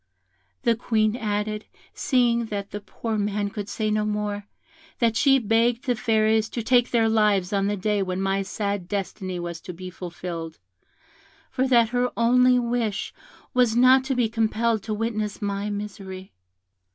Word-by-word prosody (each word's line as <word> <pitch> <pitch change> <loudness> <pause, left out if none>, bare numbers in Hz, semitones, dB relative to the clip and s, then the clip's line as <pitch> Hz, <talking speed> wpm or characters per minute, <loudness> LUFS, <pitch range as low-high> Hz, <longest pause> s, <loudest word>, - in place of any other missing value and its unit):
The 230 - +3
Queen 215 -1 +1
added, 210 -1 -2 0.3
seeing 240 -3 +2
that 205 -2 -5
the 205 - -4
poor 220 +1 -4
man 205 0 -1
could 205 -1 -5
say 215 -1 -1
no 215 0 +1
more, 210 -1 -2 0.5
that 230 -2 +2
she 270 +3 +5
begged 230 +2 +1
the 250 -2 +1
Fairies 220 0 +2
to 235 - -2
take 245 +1 +3
their 230 -2 +3
lives 210 -3 +2
on 200 0 +1
the 205 0 -1
day 205 +1 0
when 185 -1 -2
my 195 0 0
sad 200 -2 -3
destiny 190 -2 -4
was 170 -1 -5
to 180 - -8
be 185 +2 -8
fulfilled, 170 -2 -6 0.9
for 260 +1 0
that 235 -3 +4
her 250 0 +1
only 250 +2 +5
wish 235 -3 -1 0.4
was 245 -3 +3
not 255 +2 +6
to 265 - -1
be 245 -2 +2
compelled 225 0 0
to 215 - -4
witness 215 -2 -2
my 200 0 -2
misery. 195 -2 -7
215 Hz, 165 wpm, -24 LUFS, 200-235 Hz, 0.9 s, not